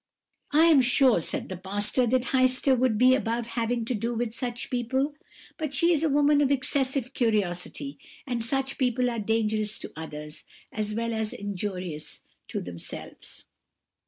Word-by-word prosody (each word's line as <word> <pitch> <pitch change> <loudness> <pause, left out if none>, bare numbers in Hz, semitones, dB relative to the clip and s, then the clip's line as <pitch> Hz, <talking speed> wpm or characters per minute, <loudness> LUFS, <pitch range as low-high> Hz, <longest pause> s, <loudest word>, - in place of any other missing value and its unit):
"'I 310 +3 +5
am 315 -5 +6
sure,' 255 -2 +4
said - - -2
the 185 - -5
pastor, 205 +6 0
'that 255 +1 +2
Heister 255 +1 +4
would 250 -3 +2
be 255 +3 +6
above 235 -2 0
having 230 0 -1
to 250 - -1
do 230 +2 -2
with 230 -1 -2
such 240 0 -3
people; 265 +4 0 0.5
but 305 -3 -2
she 335 +6 +4
is 315 -1 +1
a 320 - +3
woman 290 +1 +4
of 280 - +3
excessive 270 -1 0
curiosity, 215 +4 -1 0.3
and 245 -3 -2
such 270 +3 -1
people 250 -1 +1
are 230 - -3
dangerous 215 0 0
to - - -6
others, 150 -1 -8 0.3
as 215 -1 -3
well 230 0 -1
as 220 -1 -2
injurious 185 -5 -5 0.2
to - - -4
themselves.' 85 -1 -9
240 Hz, 160 wpm, -27 LUFS, 215-265 Hz, 0.5 s, am